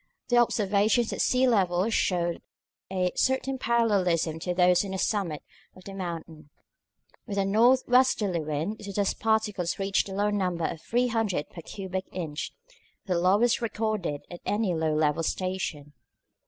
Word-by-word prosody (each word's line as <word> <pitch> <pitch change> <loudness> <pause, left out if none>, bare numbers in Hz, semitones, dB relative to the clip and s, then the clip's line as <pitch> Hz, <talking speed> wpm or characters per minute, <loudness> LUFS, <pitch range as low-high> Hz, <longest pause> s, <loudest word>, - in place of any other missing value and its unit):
The 245 - +3
observations 215 0 +2
at - - -2
sea 255 +1 +3
level 190 -4 +2
showed 175 -5 0 0.5
a 180 -1 0
certain 265 0 0
parallelism 190 -9 +1
to 180 - -3
those 180 0 +4
on 200 - -6
the 190 - -3
summit 185 -7 -1 0.3
of 185 - -15
the 195 - -9
mountain. 165 -5 -7 0.8
With 200 -2 -4
a 195 - +2
north 235 +6 +4
westerly 240 -8 +3
wind 155 +7 -3
the 200 -1 -7
dust 200 0 0
particles 215 -5 0
reached 195 0 0
the 190 - -6
low 205 +1 +1
number 180 -5 -1
of 160 - -4
300 225 -9 0
per 170 - -9
cubic 190 +2 -5
inch, 160 -5 -4 0.5
the 185 - -1
lowest 205 +8 +3
recorded 215 -9 -2
at 175 - -9
any 205 -3 0
low 160 -1 0
level 155 +1 +1
station. 165 -5 -3
190 Hz, 155 wpm, -27 LUFS, 170-220 Hz, 0.8 s, those